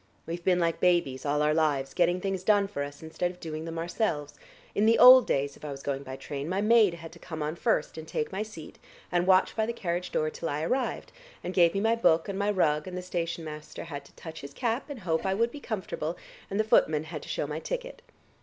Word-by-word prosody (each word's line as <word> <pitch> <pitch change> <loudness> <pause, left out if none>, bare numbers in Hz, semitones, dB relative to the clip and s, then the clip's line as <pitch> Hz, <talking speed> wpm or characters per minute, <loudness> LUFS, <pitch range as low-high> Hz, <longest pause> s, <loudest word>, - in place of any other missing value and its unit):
We've 170 +1 -5
been 180 0 +3
like 170 -1 0
babies 160 -7 +2
all 150 +1 +2
our 150 0 +3
lives, 145 -4 +1
getting 175 0 +2
things 190 -1 -2
done 205 0 +4
for 195 -8 -5
us, 145 +2 -9
instead 160 +2 -2
of 180 0 -11
doing 160 -1 -5
them 165 0 -5
ourselves. 165 -4 -2 0.4
In 210 +2 +2
the 230 - +5
old 255 0 +9
days 140 0 0
if - - -19
I 150 - -5
was 140 -1 -7
going 140 -1 -2
by 130 -1 -7
train 140 +2 -5
my 190 +2 0
maid 215 -3 +5
had 165 -1 -10
to 170 - -14
come 160 -3 -5
on 150 +2 -2
first 160 -1 0
and 160 - -9
take 150 - -2
my 195 +2 -3
seat, 210 -8 -9 0.3
and 175 0 +1
watch 185 0 +4
by 220 -1 0
the 235 - -2
carriage 180 -4 -3
door 155 0 0
till 165 - -4
I 150 +2 -2
arrived, 245 +6 -1 0.3
and 180 - -4
gave 170 -2 +4
me 195 - +1
my 225 +2 +3
book 165 -8 +3
and 200 -1 -3
my 200 +1 +1
rug, 155 -6 +1
and 180 0 -5
the 180 - -5
station 170 -2 -3
master 155 0 -8
had 145 -4 -7
to - - -19
touch 160 -1 -9
his 140 0 -10
cap 240 +3 -1
and 275 -6 -7
hope 165 -3 0
I 190 -1 0
would 230 +3 +1
be 290 - -8
comfortable, 185 - -4 0.3
and 200 - -2
the - - +4
footman 155 -8 +3
had 155 -2 -7
to - - -11
shew - - -1
my 150 +2 -4
ticket." - - -5
170 Hz, 255 wpm, -28 LUFS, 155-200 Hz, 0.4 s, old